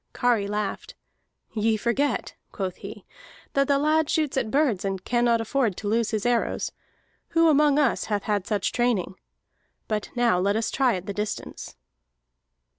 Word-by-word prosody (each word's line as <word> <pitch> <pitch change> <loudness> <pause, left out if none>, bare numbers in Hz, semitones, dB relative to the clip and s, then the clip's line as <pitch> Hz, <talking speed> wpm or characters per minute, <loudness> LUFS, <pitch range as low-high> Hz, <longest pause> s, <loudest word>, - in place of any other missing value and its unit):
Kari 235 -5 +1
laughed. 210 -1 -4 0.6
"Ye 220 0 +1
forget," 240 +6 -1 0.2
quoth 190 -2 -4
he, - - -9 0.5
"that 275 0 +2
the 280 - +3
lad 310 +1 +2
shoots 305 -3 0
at 250 -5 0
birds 265 -8 +1
and 195 -2 -3
cannot 240 -1 +2
afford 225 -4 0
to 210 - -5
lose 225 +1 +1
his 215 -1 -2
arrows. 240 -1 0 0.7
Who 330 0 +6
among 295 -1 +4
us 290 -5 +2
hath 205 -2 -1
had 205 -3 -1
such 205 -3 0
training? 235 -7 0 0.7
But 210 -1 -2
now 240 -6 +3
let 200 +2 +1
us 225 0 -1
try 260 -5 +2
at 180 0 -6
the 200 - -4
distance." 210 +1 -5
230 Hz, 160 wpm, -25 LUFS, 205-270 Hz, 0.7 s, Who